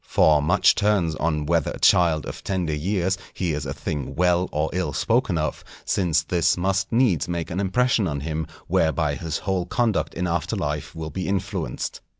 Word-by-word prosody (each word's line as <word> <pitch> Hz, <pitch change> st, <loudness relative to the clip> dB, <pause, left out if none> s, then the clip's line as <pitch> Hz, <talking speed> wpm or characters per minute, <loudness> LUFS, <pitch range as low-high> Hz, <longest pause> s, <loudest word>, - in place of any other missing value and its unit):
For 75 Hz, -2 st, +4 dB
much 90 Hz, +8 st, +4 dB
turns 100 Hz, -6 st, +1 dB
on 75 Hz, -2 st, -1 dB
whether 85 Hz, -1 st, +1 dB
a -, -, -6 dB
child 85 Hz, -3 st, +4 dB
of -, -, -7 dB
tender 90 Hz, -5 st, -1 dB
years 95 Hz, +4 st, -1 dB, 0.2 s
hears 75 Hz, -6 st, -2 dB
a 70 Hz, -, -3 dB
thing 75 Hz, -2 st, -4 dB
well 90 Hz, +1 st, +2 dB
or 75 Hz, +1 st, -1 dB
ill 90 Hz, -5 st, -1 dB
spoken 115 Hz, -, +1 dB
of, 75 Hz, -1 st, -2 dB, 0.2 s
since 85 Hz, -4 st, +1 dB
this 85 Hz, 0 st, +1 dB
must 95 Hz, +2 st, 0 dB
needs 115 Hz, -, +2 dB
make 85 Hz, -1 st, -3 dB
an 90 Hz, -, -2 dB
impression 110 Hz, +2 st, +2 dB
on 70 Hz, -3 st, -3 dB
him 80 Hz, +1 st, -3 dB, 0.2 s
whereby 80 Hz, -2 st, +1 dB
his 80 Hz, 0 st, -3 dB
whole 95 Hz, -2 st, -2 dB
conduct 115 Hz, +1 st, 0 dB
in 90 Hz, -, -1 dB
after 85 Hz, -2 st, -1 dB
life 75 Hz, +1 st, -3 dB
will 80 Hz, -1 st, -5 dB
be 90 Hz, +5 st, -4 dB
influenced. 95 Hz, -10 st, -3 dB
85 Hz, 180 wpm, -24 LUFS, 75-95 Hz, 0.2 s, For